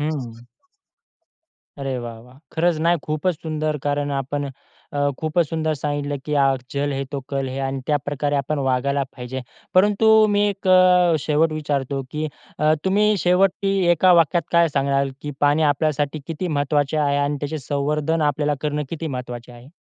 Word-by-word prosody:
हं. 150 -1 -1 1.6
अरे 135 -2 -3
वाह, 115 -1 -7
वाह! 125 +3 -17
खरंच 170 +1 +1
नाही 170 +1 +3
खूपच 155 +4 -1
सुंदर 155 -1 -2
कारण 145 0 0
आपण 140 +1 -3 0.4
अ, 145 0 +1
खूपच 160 +1 +1
सुंदर 160 -1 -1
सांगितलं, 145 0 -2
की 150 - -2
आज 135 -1 +2
जल 145 0 -1
है, 135 0 -2
तो 140 +1 -5
कल 135 -1 -2
है. 130 - -5
आणि 135 0 -2
त्याप्रकारे 145 0 -1
आपण 145 +2 -1
वागायला 140 +2 +1
पाहिजे. 125 +1 -5 0.3
परंतु 205 +3 +4 0.2
मी 205 0 +3
एक 195 -1 -4
अ, 180 -2 +5
शेवट 155 +2 +1
विचारतो 140 -3 -2
की 155 +1 -3 0.3
अ, 155 +1 +3
तुम्ही 210 +2 +3
शेवटी 195 +2 +2 0.2
एका 180 +2 +5
वाक्यात 165 +2 +1
काय 170 0 +5
सांगणार, 140 -1 +1
की 145 - -4
पाणी 145 +2 +3
आपल्यासाठी 145 0 -1
किती 170 +3 -4
महत्वाचे 145 0 0
आहे 145 -2 +2
आणि 145 +1 0
त्याचे 150 +2 -3
संवर्धन 150 +3 -1
आपल्याला 145 +1 -1
करणं 150 0 -1
किती 165 -1 -4
महत्वाचे 120 -1 -7
आहे? 120 +2 -14
150 Hz, 165 wpm, -22 LUFS, 140-160 Hz, 1.6 s, अ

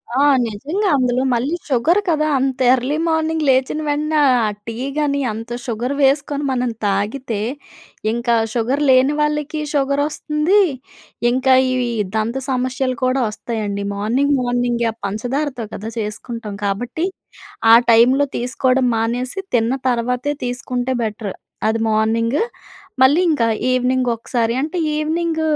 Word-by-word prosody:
ఆ! - - 0 0.3
నిజంగా 300 - -2
అందులో 250 -1 +1
మళ్ళీ 255 +8 0
షుగర్ 295 +9 +3
కదా! 305 -2 +2
అంత 265 -1 -1
ఎర్లీ 260 +4 0
మార్నింగ్ 320 -1 0
లేచిన 265 +3 +2
వెంటన, 300 +1 -1 0.3
ఆ - - +2 0.2
టీ 230 - -4 0.2
గాని, 285 -2 +1
అంత 225 +2 -7 0.2
షుగర్ 245 +2 -2
వేసుకొని 280 +1 +1
మనం 250 -1 0 0.2
తాగితే, 205 +4 -1 0.7
ఇంకా 235 +1 +1 0.2
షుగర్ 250 +5 0
లేని 260 +2 +5
వాళ్ళకి, 300 0 -1
షుగర్ 280 0 +1
వోస్తుంది. 305 +6 +1 0.7
ఇంకా 260 +1 +3 0.2
ఈ - - 0 0.4
దంత 220 +3 -1
సమస్యలు 255 0 -1
కూడా 255 +1 +2
వస్తాయండి. 210 -2 -4
మార్నింగ్, 245 +8 +1
మార్నింగ్ 245 -1 0
ఆ - - -13
పంచదారతో 245 +5 -2
కదా! 215 +2 -5
చేసుకుంటాం 215 0 -5
కాబట్టి, 240 - -2 0.7
ఆ - - +11 0.2
టైంలో 255 +5 +5
తీసుకోవడం 255 +1 +1
మానేసి, 245 - -2 0.2
తిన్న 230 +1 +1 0.2
తర్వాతే 250 +4 0
తీసుకుంటే 250 +1 -2
బెటర్, 215 -2 -4 0.4
అది 225 +1 0
మార్నింగ్. 230 +5 +1 0.6
మళ్ళీ 285 +6 +5
ఇంకా 250 -7 +2 0.3
ఈవెనింగ్ 255 0 +1
ఒకసారి 230 0 -1
అంటే, 315 +4 -3 0.2
ఈవెనింగ్ 320 +1 -1
255 Hz, 125 wpm, -19 LUFS, 230-285 Hz, 0.7 s, ఆ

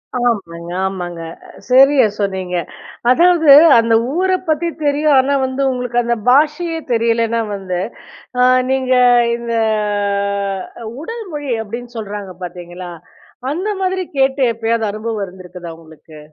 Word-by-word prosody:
ஆமாங்க. 195 -9 -2 0.2
ஆமாங்க. 180 -3 -4 0.3
அ - - -16 0.2
சரியா 265 0 +6
சொன்னீங்க. 190 -3 -2 0.5
அதாவது 335 +1 +4 0.3
அந்த 230 0 +2 0.2
ஊர 375 +1 +1 0.2
பத்தி 315 +2 +1 0.2
தெரியும், 290 0 +2
ஆனா 270 +2 +1
வந்து 260 +1 -3
உங்களுக்கு 245 -1 -3
அந்த 235 0 0
பாஷையே 310 +5 +2
தெரியலேன்னா 230 0 +1
வந்து, 185 -2 -4 0.6
அ - - +4 0.3
நீங்க 260 -1 +1 0.4
இந்த 235 0 -5 1.5
உடல் 455 +6 -6
மொழி 290 -3 -4
அப்டின்னு 240 +3 -8
சொல்றாங்க 205 -3 -6
பாத்தீங்களா? 175 0 -8 0.6
அந்த 365 +8 -2
மாதிரி 375 0 -1
கேட்டு 270 +1 +2
எப்பயாவது 225 0 -1
அனுபவம் 215 0 -4
இருந்திருக்குதா 180 -2 -10
உங்களுக்கு? 160 -1 -15
235 Hz, 120 wpm, -17 LUFS, 190-280 Hz, 1.5 s, சரியா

